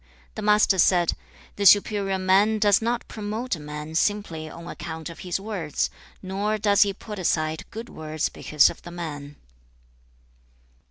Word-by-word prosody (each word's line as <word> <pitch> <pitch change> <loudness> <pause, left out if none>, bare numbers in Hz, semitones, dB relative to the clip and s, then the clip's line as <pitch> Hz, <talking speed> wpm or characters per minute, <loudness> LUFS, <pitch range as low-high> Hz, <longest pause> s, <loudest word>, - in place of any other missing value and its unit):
The 215 - -6
Master 210 -2 +4
said, 175 -1 +4 0.4
'The 200 - -1
superior 200 0 +4
man 195 +4 +3
does 205 -1 +4
not 235 +1 -1
promote 215 +2 -3
a - - -10
man 150 +1 -7
simply 165 -4 -1
on 170 +2 -10
account 160 -1 -6
of 165 - -13
his 180 0 -3
words, 195 -7 -2 0.3
nor 200 +3 -1
does 205 -1 +3
he 205 - +5
put 210 +1 -8
aside 155 -3 -1
good 225 +2 -7
words 155 -4 -3
because 150 -2 +3
of - - -13
the 175 - -10
man.' 150 -4 -7
190 Hz, 155 wpm, -25 LUFS, 160-210 Hz, 0.4 s, he